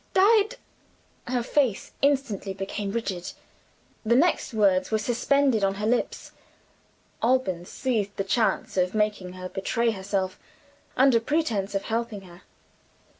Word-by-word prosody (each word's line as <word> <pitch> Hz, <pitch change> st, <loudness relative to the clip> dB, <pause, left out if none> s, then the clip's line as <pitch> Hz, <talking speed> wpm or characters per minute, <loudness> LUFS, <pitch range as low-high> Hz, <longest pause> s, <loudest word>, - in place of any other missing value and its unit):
Died 430 Hz, +4 st, +4 dB, 0.4 s
" -, -, -35 dB
Her 245 Hz, -, +1 dB
face 250 Hz, -5 st, 0 dB
instantly 260 Hz, -9 st, 0 dB
became 195 Hz, +1 st, -4 dB
rigid. 195 Hz, -6 st, -3 dB, 0.7 s
The 235 Hz, +1 st, +3 dB
next 325 Hz, +3 st, +2 dB
words 195 Hz, -4 st, +2 dB
were 220 Hz, -, +2 dB
suspended 245 Hz, +1 st, +1 dB
on 195 Hz, 0 st, +2 dB
her 210 Hz, +1 st, -3 dB
lips. 240 Hz, +3 st, -1 dB, 0.9 s
Alban 230 Hz, -8 st, +1 dB
seized 215 Hz, -3 st, -2 dB
the 195 Hz, -, 0 dB
chance 195 Hz, -1 st, 0 dB
of 185 Hz, +2 st, +1 dB
making 210 Hz, -4 st, -1 dB
her 185 Hz, 0 st, -6 dB
betray 230 Hz, +5 st, 0 dB
herself 190 Hz, -2 st, -3 dB, 0.6 s
under 260 Hz, -3 st, +5 dB
pretense 225 Hz, -8 st, -1 dB
of 195 Hz, -, -1 dB
helping 230 Hz, -2 st, -3 dB
her. 180 Hz, -1 st, -15 dB
215 Hz, 130 wpm, -26 LUFS, 195-250 Hz, 0.9 s, under